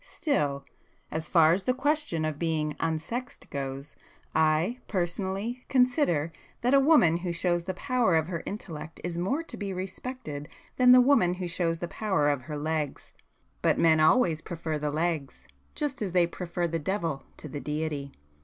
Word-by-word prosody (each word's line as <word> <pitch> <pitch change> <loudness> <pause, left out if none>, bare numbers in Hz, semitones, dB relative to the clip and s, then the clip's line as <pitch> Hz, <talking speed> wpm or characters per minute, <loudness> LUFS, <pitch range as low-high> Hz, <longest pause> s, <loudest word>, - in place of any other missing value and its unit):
Still,—as 155 - -3
far 165 -2 +6
as 185 +2 -1
the 255 - +2
question 290 - 0
of 155 -2 -3
being 155 -3 -1
'unsexed' 165 +11 -3
goes, 135 0 -5 0.4
I, 160 +9 +2
personally, 195 +6 -2
consider 250 - +2 0.3
that 250 +3 +2
a 275 - +7
woman 270 - +5
who 175 0 -3
shows 175 0 0
the 185 0 -3
power 245 -5 +1
of 160 -1 +3
her 170 -1 -4
intellect 165 -6 -7
is 170 0 -3
more 265 - 0
to - - -9
be 200 -2 -4
respected 185 - -6 0.3
than 250 -1 +7
the 250 - +9
woman 245 -10 +4
who 180 -1 -4
shows 170 -1 -1
the 175 - -2
power 190 -6 +1
of 145 -3 0
her 150 +4 -6
legs. 155 -1 -3 0.5
But - - +3
men 160 -1 +5
always 160 -1 +4
prefer 160 -3 -4
the 150 0 -1
legs,—just 155 - -3
as 195 -4 -2
they 180 -2 +5
prefer 175 0 -3
the 165 0 -2
devil 165 -4 -2 0.2
to - - -8
the 145 0 -5
Deity. 150 -2 -3
170 Hz, 165 wpm, -28 LUFS, 155-205 Hz, 0.5 s, the